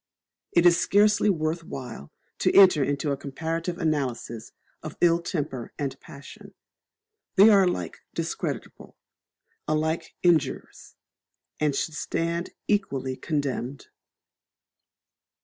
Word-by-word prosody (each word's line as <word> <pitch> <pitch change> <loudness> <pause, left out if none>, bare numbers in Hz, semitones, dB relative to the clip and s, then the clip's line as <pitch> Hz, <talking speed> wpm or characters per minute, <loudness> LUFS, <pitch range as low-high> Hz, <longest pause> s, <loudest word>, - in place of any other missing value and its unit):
It 170 0 +4
is 170 -1 +6
scarcely 210 +1 +3
worth 165 -2 -1
while 120 - -8 0.3
to - - +2
enter 185 -7 +7
into 145 +1 -1
a 140 - -1
comparative 165 +5 -4
analysis 130 -8 -2 0.3
of 155 -1 -8
ill 170 -1 +4
temper 145 - -4
and 135 -2 -3
passion; 140 0 -13 0.8
they 205 +2 +8
are 195 -2 +6
alike 90 - -3 0.2
discreditable, - - -5 0.7
alike 160 +2 -1
injurious, 160 -6 0 0.6
and 150 -2 +1
should 160 - -2
stand 170 +3 -2 0.2
equally 135 -11 -1
condemned. 140 -2 -3
155 Hz, 105 wpm, -26 LUFS, 140-170 Hz, 0.8 s, they